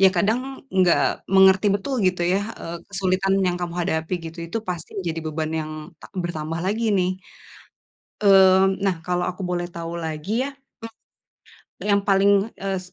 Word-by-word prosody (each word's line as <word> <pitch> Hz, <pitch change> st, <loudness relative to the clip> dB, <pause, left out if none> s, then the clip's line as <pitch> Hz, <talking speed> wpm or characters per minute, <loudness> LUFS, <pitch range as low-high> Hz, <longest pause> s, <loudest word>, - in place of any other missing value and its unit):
ya 190 Hz, -, +9 dB
kadang 250 Hz, +10 st, -1 dB
enggak 185 Hz, -2 st, +3 dB
mengerti 190 Hz, +1 st, +5 dB
betul 235 Hz, +7 st, -2 dB
gitu 185 Hz, -1 st, +1 dB
ya, 185 Hz, +3 st, +2 dB, 0.2 s
eee, 170 Hz, +1 st, -5 dB
kesulitan 195 Hz, 0 st, 0 dB
yang 180 Hz, -1 st, +1 dB
kamu 175 Hz, -1 st, -3 dB
hadapi 165 Hz, 0 st, -1 dB
gitu, 165 Hz, +1 st, -8 dB
itu 200 Hz, +7 st, -3 dB
pasti 175 Hz, -3 st, -4 dB
menjadi 165 Hz, -4 st, -3 dB
beban 155 Hz, 0 st, -2 dB
yang 155 Hz, 0 st, -5 dB, 0.3 s
ta -, -, -11 dB
bertambah 165 Hz, -2 st, -3 dB
lagi 220 Hz, +4 st, -1 dB
nih, 180 Hz, 0 st, +2 dB, 1.1 s
eee, 190 Hz, -1 st, +7 dB, 0.2 s
nah 190 Hz, -2 st, +2 dB
kalau 180 Hz, 0 st, 0 dB
aku 185 Hz, +2 st, -5 dB
boleh 175 Hz, -1 st, -1 dB
tahu 170 Hz, 0 st, -5 dB
lagi 160 Hz, +3 st, -5 dB, 0.2 s
ya, -, -, -4 dB, 1.3 s
yang 200 Hz, -1 st, +3 dB
paling, 195 Hz, 0 st, +4 dB, 0.3 s
eee, 195 Hz, -1 st, -1 dB
185 Hz, 155 wpm, -23 LUFS, 170-195 Hz, 1.3 s, ya